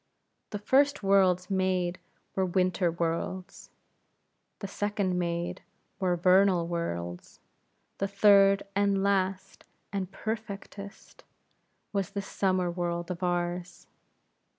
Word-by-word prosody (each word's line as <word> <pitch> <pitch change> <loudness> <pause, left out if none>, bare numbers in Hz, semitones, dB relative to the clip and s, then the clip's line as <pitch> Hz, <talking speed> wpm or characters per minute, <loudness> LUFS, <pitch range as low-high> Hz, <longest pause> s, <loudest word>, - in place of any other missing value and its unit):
The 210 - -4
first 265 +4 +2
worlds 190 -1 +3
made 185 -2 0 0.4
were 190 - +2
winter 185 0 +1
worlds; 170 +2 -3 0.9
the 200 - -6
second 200 -2 -1
made, 170 0 -2 0.4
were 180 -2 +1
vernal 185 0 +4
worlds; 90 - -4 0.6
the 195 - 0
third, 200 0 +5
and 200 -1 +2
last, 195 -1 -1 0.3
and 195 -2 -3
perfectest, 200 -2 -7 0.7
was 200 -1 -1
this 200 -1 -4
summer 185 -2 0
world 170 0 -3
of 180 0 -6
ours. 175 0 -2
185 Hz, 105 wpm, -29 LUFS, 175-200 Hz, 0.9 s, third